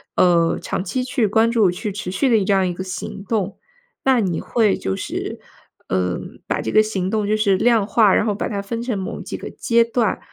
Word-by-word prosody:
呃， 170 -2 +3
长 - - -3
期 255 +3 -2
去 250 -3 0
关 220 +3 +3
注、 220 -5 +4
去 205 +4 -3
持 195 -2 -5
续 190 +9 +1
的 220 -4 +4
这 200 - +2
样 195 - +3
的 185 - +1
一 - - -3
个 185 - -5
行 195 +2 -6
动。 205 -3 -1 0.5
那 260 -3 +4
你 180 -5 -1
会 220 -4 +1
就 95 - -2
是， - - -5 0.5
呃， 90 -1 0 0.3
把 - - -1
这 110 - -3
个 - - +6
行 195 -4 -2
动 215 0 0
就 215 - +2
是 205 -3 +2
量 230 -1 +3
化 210 -2 +4
然 - - +2
后 215 - +1
把 200 - -3
它 200 -1 -3
分 230 +4 -4
成 235 -3 -2
某 190 -1 -5
几 - - -6
个 - - -7
阶 235 0 +2
段， 230 -2 0
205 Hz, 250 characters per minute, -21 LUFS, 185-230 Hz, 0.5 s, 个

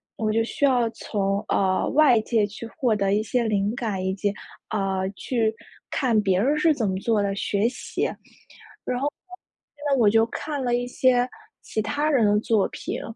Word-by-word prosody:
我 215 -1 -1
就 225 +1 +2
需 285 - -5
要 245 -4 +3
从， 200 -2 -2
呃， 190 -1 +2
外 270 -7 +5
界 220 -2 +1
去 210 +3 -9
获 250 -8 +2
得 195 -1 +1
一 210 - +2
些 235 +3 0
灵 210 0 0
感， 210 -6 -3
以 190 - 0
及， 200 0 -1 0.4
呃， 190 -2 -1
去 225 -3 0 0.4
看 240 -6 +1
别 190 -2 +2
人 285 +6 +2
是 315 +1 +4
怎 230 -8 -1
么 190 - -1
做 220 -1 +1
的， 200 -1 -1
学 205 +2 0
习。 245 - -4 0.8
然 250 - -1
后 280 - 0
呢， - - -2 0.6
现 290 - -14
在 275 - +3
我 215 - +5
就 225 +2 +4
看 285 +3 -4
了 245 -1 0
一 245 0 -2
些 250 0 +2 0.3
其 215 - -3
他 290 +8 -1
人 260 -7 +3
的 205 0 +3
作 215 -2 +2
品， - - -5
225 Hz, 210 characters per minute, -24 LUFS, 205-250 Hz, 0.8 s, 外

